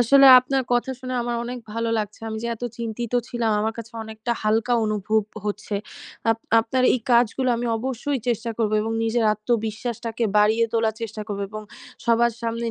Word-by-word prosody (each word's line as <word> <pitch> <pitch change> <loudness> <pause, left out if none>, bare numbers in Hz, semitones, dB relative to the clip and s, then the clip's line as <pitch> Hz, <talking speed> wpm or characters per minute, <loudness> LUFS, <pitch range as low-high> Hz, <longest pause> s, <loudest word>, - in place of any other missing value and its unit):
আসলে 275 +3 +7
আপনার 265 +1 0
কথা 245 +2 +1
শুনে 255 0 -4
আমার 240 0 -2
অনেক 245 +1 -5
ভালো 230 0 -1
লাগছে। 210 0 -4
আমি 220 0 -4
যে 235 - -2
এত 230 - -17 0.2
চিন্তিত 235 0 -4 0.2
ছিলাম, 235 -2 -1
আমার 220 +1 0
কাছে 230 +1 -8
অনেকটা 220 +2 -4
হালকা 220 +3 +1
অনুভব 215 0 +1 0.2
হচ্ছে। 205 0 -3 0.6
আপ 225 - +1 0.2
আপনার 255 +3 -1
এই 255 - -1
কাজগুলো 240 +2 +3
আমি 240 - -2
অবশ্যই 265 +3 -2
চেষ্টা 230 0 -1
করবো 215 -1 +1
এবং 225 - -2
নিজের 225 0 +1
আত্মবিশ্বাসটাকে 225 +1 -2
বাড়িয়ে 220 +2 +4
তোলার 225 -1 +1
চেষ্টা 220 -1 -5
করবো 200 -2 -4
এবং 215 0 -6 0.4
সবার 235 0 +3
সামনে 230 0 -2
230 Hz, 175 wpm, -23 LUFS, 220-240 Hz, 0.6 s, আসলে